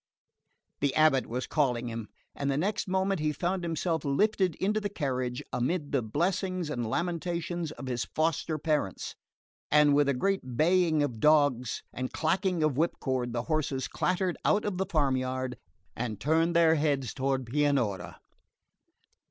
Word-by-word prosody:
The 140 -1 0
abate 155 -4 +4
was 125 +2 -3
calling 125 -5 0
him, 115 -2 -5 0.3
and 140 0 -2
the 135 - +1
next 195 +7 -1
moment 190 0 +1
he 150 0 +1
found 180 +4 -2
himself 165 -1 -1
lifted 185 +4 +1
into 210 +3 0
the 205 - -2
carriage, 130 -8 -2
amid 145 +5 -1
the 135 - +2
blessings 175 - -1
and 120 -5 -2
lamentations 170 +1 -2
of 140 - -9
his 125 -3 -2
foster 155 0 -1
parents; 150 - -1 0.5
and 150 -1 +5
with 145 0 +4
a 140 - +2
great 130 -6 -1
baying 165 -1 +3
of 125 -6 -3
dogs 145 -5 +3
and 130 0 -4
clacking 180 +1 0
of 150 -4 +1
whipcord 130 -6 0
the 120 0 -2
horses 145 -4 -1
clattered 185 0 -1
out 210 - +2
of 195 -3 -2
the 190 - 0
farmyard, 130 -4 0 0.4
and 115 -4 -3
turned 165 +5 +2
their 165 -1 +6
heads 145 -6 0
toward 135 -1 -1
Pianura. 125 -8 0
150 Hz, 150 wpm, -29 LUFS, 130-170 Hz, 0.5 s, their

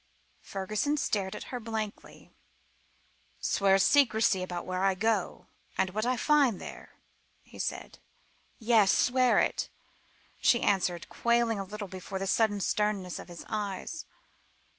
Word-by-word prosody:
Fergusson 215 +10 -2
stared 195 -8 -1
at - - -6
her 250 - -2
blankly. 220 -2 -6 1.1
"Swear 195 -1 +3
secrecy 220 -4 +4
about 175 -1 -4
where 185 0 -2
I 195 -1 +3
go, 215 -1 -1 0.3
and 190 - +1
what 215 +4 -1
I 255 0 +1
find 280 -7 +3
there?" - - -10 0.5
he - - -15
said. - - -4 0.6
"Yes 220 -4 +4
swear 255 -1 +3
it," - - +1 0.7
she 240 - +3
answered, 180 -3 +1
quailing 235 -2 +1
a - - -2
little 205 +1 -7
before 190 +1 -6
the 195 - -3
sudden 205 0 +2
sternness 200 -3 -1
of - - -9
his 175 -1 -10
eyes. 210 - -4
210 Hz, 135 wpm, -29 LUFS, 190-230 Hz, 1.1 s, secrecy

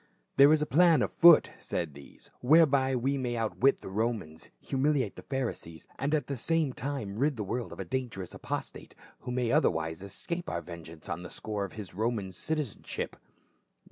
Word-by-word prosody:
"There 140 +2 +8
is 155 -1 +4
a - - 0
plan 160 -1 +5
on - - -1
foot," 170 -2 +7
said 80 -4 -3
these, 70 0 -14
" - - -36
whereby 140 -2 +5
we 135 +3 0
may 120 -2 -2
outwit 115 +4 +2
the - - -7
Romans, 100 -6 -3
humiliate 135 -4 0
the - - -9
Pharisees, 120 - -4
and 145 +3 +1
at 145 -4 -1
the 140 - -3
same 155 +2 0
time 125 -7 -4
rid 140 -1 +1
the 105 - -2
world 120 +5 -3
of - - -10
a - - -4
dan 130 -1 -2
gerous 95 -5 -7
apostate, - - -6 0.2
who 125 - -6
may 125 -2 0
otherwise 80 0 +1
escape 170 - -5
our 85 - -3
ven 85 0 -9
geance 80 -1 -12
on - - -4
the 90 - -8
score 105 -2 -4
of 95 - -10
his 105 -4 -8
Roman 110 -1 -1
citizenship." 145 - -4
125 Hz, 195 wpm, -30 LUFS, 95-140 Hz, 0.2 s, There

